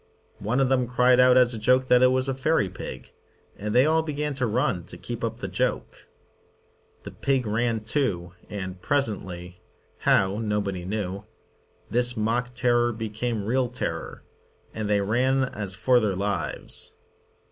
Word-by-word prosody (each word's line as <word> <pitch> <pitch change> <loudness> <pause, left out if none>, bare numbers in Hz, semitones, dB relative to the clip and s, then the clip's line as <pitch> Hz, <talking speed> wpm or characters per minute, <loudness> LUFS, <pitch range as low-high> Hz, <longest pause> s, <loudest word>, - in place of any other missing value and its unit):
One 110 +6 -1
of 135 - +3
them 125 -2 +1
cried 125 +1 +4
out 125 0 +6
as 125 -1 +5
a 115 - -5
joke 125 +4 +3
that 125 -1 +5
it 130 - +7
was 130 +1 +1
a 135 - 0
fairy 130 -6 +1
pig, 65 -7 -9 0.4
and 105 +1 -4
they 125 +2 +6
all 160 +1 +3
began 150 -1 -3
to 130 -2 -1
run 115 - 0
to - - -7
keep - - -6
up - - -3
the - - -3
joke. - - -3 1.0
The - - -8
pig 135 -3 0
ran 110 +1 0
too, 105 -9 -1 0.2
and 95 -2 -6
presently, 90 -10 -2 0.4
how 95 +2 +2
nobody 100 -4 -2
knew, 100 0 -4 0.7
this 120 0 +3
mock 120 +3 -1
terror 120 -1 +2
became 110 -1 -3
real 125 +2 +1
terror, 100 -9 -5 0.5
and 110 -1 -3
they 105 -1 +2
ran 130 +6 +2
as 105 -7 -3
for 125 +3 +3
their 105 -4 0
lives. 100 +2 -3
120 Hz, 160 wpm, -25 LUFS, 100-130 Hz, 1.0 s, it